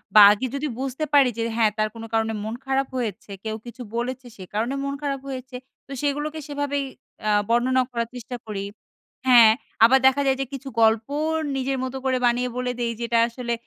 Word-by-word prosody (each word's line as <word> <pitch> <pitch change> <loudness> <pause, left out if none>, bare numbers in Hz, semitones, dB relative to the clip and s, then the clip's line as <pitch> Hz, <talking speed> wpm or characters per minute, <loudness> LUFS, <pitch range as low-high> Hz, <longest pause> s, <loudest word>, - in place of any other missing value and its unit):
বা 210 - +11
আগে 215 +5 0
যদি 295 +2 -2
বুঝতে 270 +3 -2
পারি 275 -3 +6
যে, - - -1
হ্যাঁ 220 -2 +3
তার 215 0 +1
কোনো 225 0 -7
কারণে 225 0 +1
মন 220 +1 -4
খারাপ 270 0 0
হয়েছে, 215 -4 -4
কেউ 220 0 -3
কিছু 240 +1 -10
বলেছে, 255 +2 -3
সে 190 - -10
কারণে 230 +6 -1
মন 280 0 -2
খারাপ 275 -2 -2
হয়েছে, 255 -1 -7 0.3
তো - - -13
সেগুলোকে 295 +2 -2
সেভাবেই 285 -1 -2 0.5
আ - - +4 0.2
বর্ণনা 255 +2 +3
করার 235 -1 -2
চেষ্টা 245 +1 -6
করি। 200 -2 -4 0.6
হ্যাঁ, 235 -3 +8 0.3
আবার 265 +3 +5
দেখা 275 +2 +3
যায় 265 0 +3
যে - - -1
কিছু 275 0 -7
গল্প 220 +1 +4 0.5
নিজের 270 0 -1
মতো 260 +1 -4
করে 260 -1 +2
বানিয়ে 245 +1 +2
বলে 250 0 -1
দেই, 235 -1 0
যেটা 235 0 +1
আসলে 235 0 -4
250 Hz, 195 wpm, -24 LUFS, 230-270 Hz, 0.6 s, বা